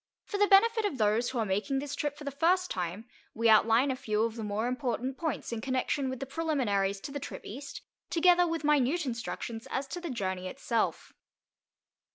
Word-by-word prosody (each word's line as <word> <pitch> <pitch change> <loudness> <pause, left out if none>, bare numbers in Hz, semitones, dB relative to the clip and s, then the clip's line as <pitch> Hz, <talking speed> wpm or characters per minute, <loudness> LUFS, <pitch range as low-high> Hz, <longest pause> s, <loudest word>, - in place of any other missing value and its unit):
For 405 - -4
the 410 - +5
benefit 445 +3 +5
of 400 -10 -1
those 220 +2 +2
who 260 - -4
are 225 - +1
making 205 +8 0
this 285 +1 -3
trip 290 -1 -2
for 295 - -9
the 280 - -3
first 355 +6 +2
time, 180 +4 -3 0.3
we 230 +1 +2
outline 225 +4 +5
a - - -1
few 215 -3 0
of 230 -1 -1
the 225 - -5
more 210 +2 -1
important 255 0 -2
points 315 -5 -3
in 230 -1 -3
connection 260 +2 -1
with 260 -1 -5
the 275 - -3
preliminaries 250 -11 0
to 275 - -6
the 285 - -4
trip - - -7
East, 275 +7 -7 0.3
together 355 +1 +4
with 330 -1 -2
minute 295 +2 +2
instructions 230 -2 -5
as 270 - -2
to 350 - -5
the 345 - -4
journey 190 -7 -3
itself. 230 +1 -2
260 Hz, 200 wpm, -30 LUFS, 225-300 Hz, 0.3 s, the